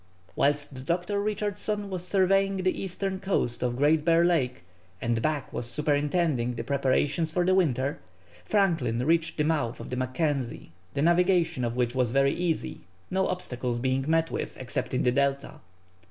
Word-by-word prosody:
Whilst 145 -2 0
Dr. 175 +6 -1
Richardson 205 0 -2
was 180 -2 -3
surveying 195 0 +3
the 185 0 0
eastern 190 0 -3
coast 185 -11 -1
of 125 -1 0
Great 150 +3 +3
Bear 165 +1 +4
Lake, 130 - +1 0.4
and 115 +1 0
Back 150 -1 -2
was 120 - -4
superintending 145 -2 0
the - - -4
preparations 140 +3 +1
for 175 +2 +1
the 185 - +3
winter, 140 -7 +1 0.4
Franklin 160 - +1
reached 165 +1 +1
the 150 - +2
mouth 150 -7 0
of - - -8
the - - -1
Mackenzie, 130 - -2 0.2
the 140 - +1
navigation 175 -4 +3
of 120 0 -1
which 125 -1 0
was 125 -2 +1
very 135 +3 +3
easy, 170 -2 -2 0.3
no 190 0 +1
obstacles 125 -9 -3
being 130 +2 0
met 165 +1 +2
with, - - -4
except 130 0 -3
in - - +1
the 125 - +3
Delta. 140 +1 -1
150 Hz, 165 wpm, -27 LUFS, 130-180 Hz, 0.4 s, Bear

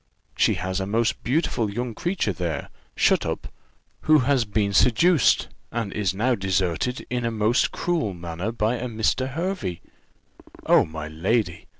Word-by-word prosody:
She - - +3
has 95 +2 -2
a 95 - -3
most 115 +2 0
beautiful 125 -5 0
young 120 +3 -3
creature 175 - -1
there, 85 -5 -3 0.3
shut - - +3
up, - - -4 0.5
who 155 0 +4
has 135 -4 +2
been 100 -1 0
seduced, 135 - +4 0.2
and 115 -4 -3
is 100 -4 0
now 115 +7 +1
deserted 95 +3 -1
in 125 -1 -1
a 115 - +1
most 110 +3 +1
cruel 160 - -1
manner 85 +4 -4
by 115 +1 0
a 125 - -4
Mr. 115 +3 0
Hervey. 160 - -3 0.9
Oh, - - +5
my 80 -1 -6
lady! 85 +3 -1
110 Hz, 155 wpm, -24 LUFS, 95-125 Hz, 0.9 s, Oh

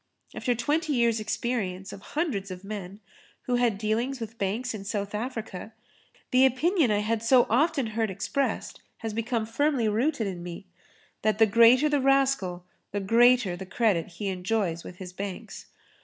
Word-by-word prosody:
After 245 - -1
twenty 295 +6 0
years' 235 -3 +2
experience 200 -4 -3
of 195 - -10 0.2
hundreds 230 - -1
of 185 0 -8
men, 200 -1 -7 0.4
who 245 -1 0
had 240 -4 +2
dealings 230 +5 -1
with 225 0 -7
banks 220 +5 -1
in 210 -3 -6
South 200 -1 -3
Africa, 220 -2 -5 0.6
the 255 +1 +5
opinion 285 - +3
I 205 -1 +2
had 220 +1 -1
so 245 +2 +5
often 290 +2 +2
heard 220 -1 0
expressed 215 +8 -2 0.2
has 220 - -2
become 230 0 -1
firmly 255 +1 +1
rooted 235 +4 +1
in 185 -3 -4
me, 175 +2 -8 0.6
that 215 -1 +1
the 225 - +6
greater 235 +6 +6
the 290 -2 +1
rascal 270 -10 +1 0.3
the 205 - -1
greater 230 -1 +4
the 190 +1 -8
credit 190 -4 +1
he 200 +2 -3
enjoys 185 -2 -1
with 180 - -9
his 180 0 -9
banks. 195 0 -7
225 Hz, 165 wpm, -27 LUFS, 195-250 Hz, 0.6 s, the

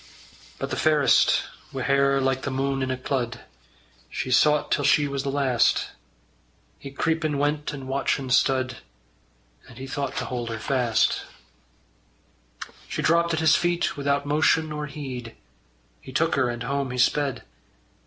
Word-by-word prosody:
But - - -5
the - - -2
fairest, 150 -5 +4 0.3
wi' 135 -1 -4
hair 140 0 +3
like 135 0 0
the 140 - -3
mune 135 +1 -1
in 130 - -1
a 130 - -1
clud, 125 -2 -3 0.7
She 130 - -4
sought 150 +3 +3
till - - +1
she 150 -1 +4
was 140 -1 -3
the 140 - -3
last. 135 -4 +2 0.9
He 140 - -8
creepin' 155 +1 -1
went 145 +1 -1
and 135 -2 -8
watchin' 135 -1 -1
stud, 130 0 +2 0.9
And - - -14
he 130 - -7
thought 140 0 -4
to - - -2
hold 120 -2 -4
her 115 - -4
fast. 120 0 +1 1.7
She - - -4
dropped 170 0 +3
at 160 - -2
his 160 -2 +5
feet 175 0 0
without 140 0 0
motion 155 +2 +2
or 150 0 -4
heed; 130 -5 -7 0.7
He - - -11
took 165 +5 +1
her, 130 -3 +2
and 120 0 -4
home 140 +1 -2
he 125 - -5
sped. 140 +2 +1
140 Hz, 155 wpm, -25 LUFS, 130-150 Hz, 1.7 s, his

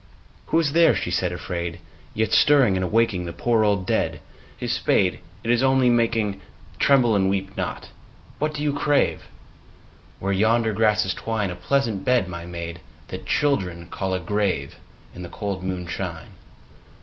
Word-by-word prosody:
II. - - -28
Who 165 - +2
is 155 -3 +1
there, 170 0 +5
she 90 - -2
said 90 0 0
afraid, 85 -1 -4 0.4
yet 110 0 0
Stirring 135 -9 +5
and 95 - 0
awaking 105 -2 +1
The 85 - -5
poor 115 -2 +1
old 100 -3 +1
dead? - - 0 0.4
His - - -2
spade, 90 -2 +1 0.2
it 115 - 0
Is 120 0 +3
only 130 -2 +4
making, 115 -4 +1 0.2
— - - -24
(Tremble 125 -5 +4
and 95 -1 +2
weep 95 0 -2
not - - -3
I - - -12 0.5
What 150 +1 -1
do 145 - -3
you 145 -1 +1
crave 145 0 +1 0.5
?) - - -28
Where 100 +1 -1
yonder 110 +3 +2
grasses 105 -2 +2
twine, 105 -2 -2
A - - -6
pleasant 110 +2 0
bed, 125 -7 +2
my 85 -1 -7
maid, 85 -1 -6 0.3
that - - -7
Children 90 - 0
call 95 -1 -2
a - - -1
grave, 90 -6 -1 0.4
In 90 - -9
the 85 - -7
cold 100 -2 -4
moonshine. 90 -2 -4
100 Hz, 175 wpm, -23 LUFS, 90-120 Hz, 0.5 s, there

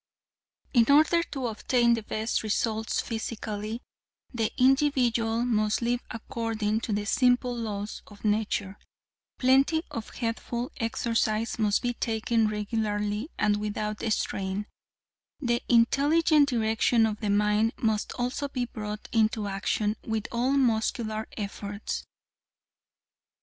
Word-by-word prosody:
"In 235 -2 +4
order 315 +4 +5
to 275 -6 -5
obtain 235 +1 +2
the 230 - 0
best 215 +2 -2
results 220 +1 0
physically, 220 0 -4 0.5
the 225 -3 0
individual 250 -4 +3
must 215 -3 +1
live 240 +1 +1
according 225 -2 -2
to 230 - -3
the 205 0 -1
simple 245 +2 +2
laws 210 -3 -4
of 205 0 -13
nature. 205 -2 0 0.6
Plenty 275 +5 +3
of 225 -2 -5
good - - -13
healthful 235 +1 -2
exercise 225 -1 0
must 210 0 +2
be 245 0 0
taken 225 -1 0
regularly 210 +2 -2
and 210 -1 +2
without 210 0 -3
strain. 195 -1 -1 0.7
The 240 -4 0
intelligent 290 +5 +4
direction 225 -1 +2
of 215 -1 -2
the 210 - -2
mind 210 +2 +2
must 220 -2 0
also 250 +3 -2
be 255 -3 -2
brought 210 -3 -6
into 220 -1 +2
action 210 +2 -1
with 220 -1 -2
all 245 +3 +1
muscular 220 -4 0
efforts. 205 0 -4
225 Hz, 120 wpm, -27 LUFS, 210-245 Hz, 0.7 s, order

